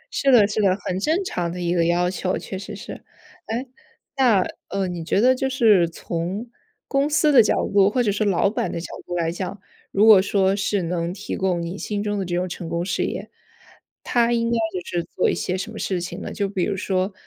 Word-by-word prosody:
是 275 - +3
的 220 -5 +6
是 215 +1 -1
的， 195 -1 +3
很 185 +1 -1
正 320 - +1
常 175 - -2
的 180 - -6
一 175 0 0
个 170 -1 +2
要 175 +1 +2
求， 185 0 -2
确 190 - -7
实 210 +1 -7
是。 200 - -9 0.4
哎， 235 +4 -2 0.5
那， 235 -9 +4 0.2
呃， 195 -1 -1
你 175 -2 -5
觉 185 - +1
得 255 +3 +5
就 265 +1 -1
是 215 -10 +4
从 180 +8 -4 0.4
公 280 +1 +1
司 305 0 +3
的 250 -4 +8
角 215 - +2 0.2
度 200 -1 +5
或 245 +3 +1
者 210 - +1
是 210 +2 0
老 195 -3 +2
板 205 - -1
的 170 - -3
角 165 - -6 0.2
度 175 - -4
来 165 -1 0
讲， 185 +2 -5 0.3
如 205 +2 +3
果 215 -4 +8
说 195 0 +2
是 200 -1 0
能 170 0 -2
提 195 +3 -5
供 180 -3 0
你 175 +4 -5
心 205 -1 -3
中 205 -1 -1
的 190 - -2
这 175 0 -2
种 180 +1 0
成 175 -1 -6
功 170 +1 -2
事 - - -1
业， - - -5 0.7
他 240 -1 +2
应 230 0 0
该 235 - +2
就 180 -3 -5
是 175 -1 -2
做 - - +2
一 - - -1
些 185 - -2
什 220 +4 -5
么 220 - -8
事 185 -2 -1
情 175 - -6
呢？ - - -6
就 200 -2 -1
比 190 -2 -1
如 200 - -1
说 190 0 -1
195 Hz, 255 characters per minute, -23 LUFS, 180-220 Hz, 0.7 s, 的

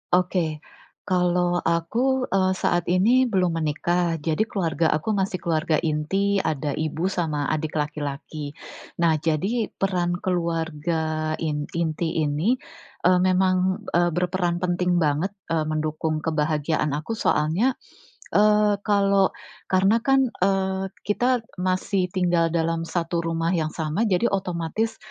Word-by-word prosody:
Oke, 175 -3 +1 0.5
kalau 180 -1 +1
aku, 245 +11 +1
eee, 190 -1 +2
saat 175 -2 0
ini 225 +8 +4
belum 180 -4 +1
menikah, 165 +2 0
jadi 160 +7 0
keluarga 165 -7 0
aku 155 +8 0
masih 190 -2 -1
keluarga 160 -2 0
inti, 170 +6 0
ada 150 -2 -1
ibu 160 +3 -1
sama 155 -6 -1
adik 155 0 -1
laki-laki. 150 0 -4 0.5
Nah, 165 -2 +4
jadi 170 +9 -1
peran 180 -3 -1
keluarga 160 -3 -1
in 150 -2 -2
inti 165 -1 -1
ini, 170 - +1 0.5
eee, 180 0 +5
memang, 185 0 +1
eee, 175 0 +2
berperan 175 0 0
penting 180 0 +1
banget, 155 +4 +1 0.2
eee, 165 -1 0
mendukung 155 0 -2
kebahagiaan 155 -1 0
aku 155 +10 -3
soalnya, 185 +5 +2 0.6
eee, 210 -1 +4
kalau 200 -2 +3 0.4
karena 195 +5 +3
kan, 270 +2 +3 0.2
eee, 190 0 +1 0.2
kita 245 +3 +1 0.2
masih 185 0 0
tinggal 175 -2 +1
dalam 165 0 -1
satu 170 -1 -1
rumah 165 0 -1
yang 160 -4 0
sama 160 +8 -1
jadi 185 +3 +1
otomatis 190 +3 -2
175 Hz, 125 wpm, -24 LUFS, 155-190 Hz, 0.6 s, eee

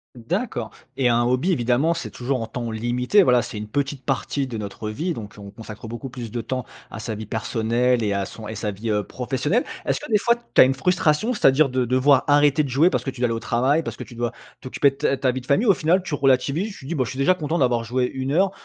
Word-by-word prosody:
D'accord. 115 -2 -3 0.3
Et 130 -3 +2
un 120 0 +3
hobby, 130 +9 +1
évidemment, 130 +3 +2
c'est - - -5
toujours 130 +1 -2
en 115 - -3
temps 120 +1 -5
limité. 120 - +2
Voilà, 125 -6 +4
c'est 115 -2 -7
une 105 0 -5
petite 135 +2 -3
partie 135 +1 -1
de 120 -4 -5
notre 105 +1 -5
vie. 160 +11 -2
Donc, 105 -7 -8
on 100 -1 -9
consacre 110 +1 -10
beaucoup 120 +3 -6
plus 120 -2 -7
de 120 - -4
temps 130 0 -4 0.3
à - - -7
sa 110 0 -4
vie 110 +1 -6
personnelle 115 +3 0
et 105 -1 0
à 100 0 -1
son 110 +1 -9
et 110 - -5
sa 105 0 -3
vie, 105 +3 -4
heu, 105 -1 +1
professionnelle. 135 - -1 0.2
Est-ce - - +1
que - - -9
des 210 - +4
fois, 235 +3 +3 0.2
tu - - +7
as - - +9
une 130 +1 +1
frustration, 175 - +1
c'est-à-dire, 145 - +4
de 130 0 0
devoir 130 +2 +3
arrêter 145 0 +4
de 140 - -4
jouer 150 +8 +4
parce - - -1
que - - -3
tu 130 -2 -8
dois - - +4
aller 115 - 0
au 115 - -2
travail? 125 +7 +1
Parce - - -6
que - - -6
tu - - -13
dois 120 0 -3 0.3
t'occuper 135 +2 +2
de - - -16
ta 135 - +1
ta 130 -1 +1
vie 130 +1 -4
de 125 - -17
famille? 145 +12 +3
Ou 210 - +6
au - - +5
final, 180 +3 +1
tu 180 - -6
relativises, 140 +9 +1
tu 135 - -12
dis: 155 - -3
«Bah 130 -4 +1
je - - -6
suis 130 - -7
déjà 135 +7 +4
content 165 -2 -2
d'avoir 125 -5 +2
joué 125 +2 0
1 135 +1 -2
heure», 190 +4 +3
130 Hz, 275 wpm, -23 LUFS, 115-145 Hz, 0.3 s, as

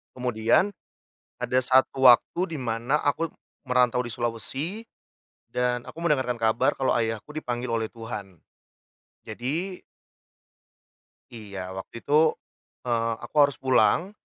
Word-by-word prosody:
Kemudian, 125 - +2 0.7
ada 125 +1 +2
satu 130 +1 +3
waktu 165 +7 +3
di - - -6
mana 120 +4 0
aku 160 +3 +1 0.4
merantau 125 -1 +3
di 120 - -6
Sulawesi 135 - -3 0.7
dan 125 -1 0
aku - - -10
mendengarkan 130 -7 +1
kabar 110 +1 +2
kalau 135 - +1
ayahku 115 +4 -2
dipanggil 125 -4 -3
oleh 115 -1 -1
Tuhan. 105 -6 -8 0.9
Jadi 150 - -4 1.5
Iya, 100 -5 -7
waktu 115 +4 -8
itu, 155 +2 +4 0.5
eee, 115 -2 0
aku 120 - -11
harus 145 -2 +5
pulang. 135 +8 +3
125 Hz, 115 wpm, -26 LUFS, 115-145 Hz, 1.5 s, harus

